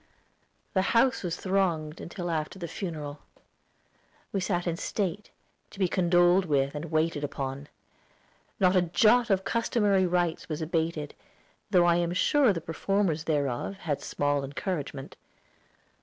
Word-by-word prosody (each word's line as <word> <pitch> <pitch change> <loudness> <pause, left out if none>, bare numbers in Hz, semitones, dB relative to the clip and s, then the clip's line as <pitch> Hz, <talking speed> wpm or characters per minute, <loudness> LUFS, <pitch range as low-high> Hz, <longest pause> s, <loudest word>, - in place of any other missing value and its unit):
The 190 - +3 0.2
house 260 +2 +3
was 175 -3 -2
thronged 175 -6 -1
till 175 -2 -4
after 155 +3 -3
the 175 -3 -5
funeral. 155 -4 -5 1.1
We 195 - -1
sat 180 -2 -1
in 170 -2 0
state, 195 +2 -3 0.4
to - - -15
be 190 -2 +2
condoled 175 +1 +3
with 140 -3 +1
and 150 +2 -5
waited 155 -1 0
upon. 140 0 -4 0.9
Not 185 -1 +4
a 185 - +5
jot 225 +7 +3
of 195 -2 +3
the - - -25
customary 210 -5 +2
rites 175 -2 -1
was 155 - -3
abated, 160 -2 -2 0.6
though 180 -4 +4
I 170 0 +4
am 175 0 0
sure 270 - +4
the 170 -4 -3
performers 165 0 -1
thereof 145 +2 -1
had 150 -7 -3
small 145 -1 -1
encouragement. 140 -1 -5
175 Hz, 140 wpm, -28 LUFS, 155-190 Hz, 1.1 s, a